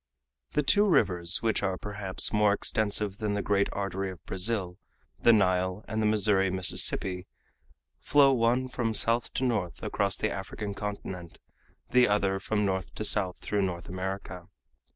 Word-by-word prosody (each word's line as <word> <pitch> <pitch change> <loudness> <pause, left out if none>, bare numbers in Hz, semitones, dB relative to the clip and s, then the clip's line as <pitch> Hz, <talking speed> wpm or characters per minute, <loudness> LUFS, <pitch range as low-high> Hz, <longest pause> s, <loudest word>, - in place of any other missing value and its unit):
The 150 - +1
two 205 +10 +4
rivers 90 - +2
which 110 -1 +1
are, 95 -2 -1
perhaps, 100 -2 -1
more 105 -1 +3
extensive 105 -1 -1
than 105 -2 -1
the 100 - -2
great 100 -1 +1
artery 100 -1 -3
of 90 -3 -11
Brazil, 95 -1 -2 0.4
the 115 - +5
Nile 95 -1 +1
and 110 0 -2
the 110 - +2
Missouri 105 -2 +3
Mississippi, 90 0 +1 0.7
flow 140 -2 +4
one 125 +1 +1
from 120 -3 -2
south 115 +2 +3
to 130 - -1
north 110 -9 -2
across 100 -1 -1
the - - -1
African 100 +1 -5
continent, 95 -4 -7 0.5
the 125 0 +5
other 100 -2 +1
from 105 +1 -1
north 95 -2 -3
to 110 - -4
south 95 -4 0
through 105 -1 -1
North 90 -3 -3
America. 95 -1 -6
100 Hz, 155 wpm, -28 LUFS, 95-110 Hz, 0.7 s, the